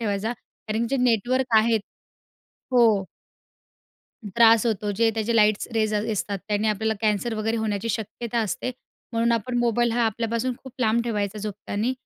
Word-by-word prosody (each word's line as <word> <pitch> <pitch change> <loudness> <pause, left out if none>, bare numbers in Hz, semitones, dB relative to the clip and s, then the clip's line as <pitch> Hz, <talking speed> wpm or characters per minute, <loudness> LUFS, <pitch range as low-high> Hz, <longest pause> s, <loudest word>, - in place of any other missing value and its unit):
ठेवायचा 215 +1 -1
कारण 225 0 -5
जे 275 - +1
नेटवर्क 250 0 +2
आहेत 225 -1 +2 0.9
हो. 225 -5 +5 1.3
त्रास 230 0 +6
होतो. 210 -2 0
जे 225 +3 +2
त्याचे 225 +1 0
लाईट्स 210 -1 +3
रेज 215 -1 +1
असतात, 210 -1 -1
त्याने 210 +1 0
आपल्याला 220 +1 0
कॅन्सर 215 +2 0
वगैरे 220 +1 -1
होण्याची 220 0 -2
शक्यता 230 +2 -3
असते. 225 +4 -2 0.4
म्हणून 230 +1 +1
आपण 240 +2 -1
मोबाईल 240 0 +2
हा 240 +1 0
आपल्यापासून 230 +3 -1
खूप 265 - -10
लांब 235 0 +2
ठेवायचा 210 -3 -2
झोपताना 210 +3 -3
225 Hz, 145 wpm, -24 LUFS, 210-235 Hz, 1.3 s, त्रास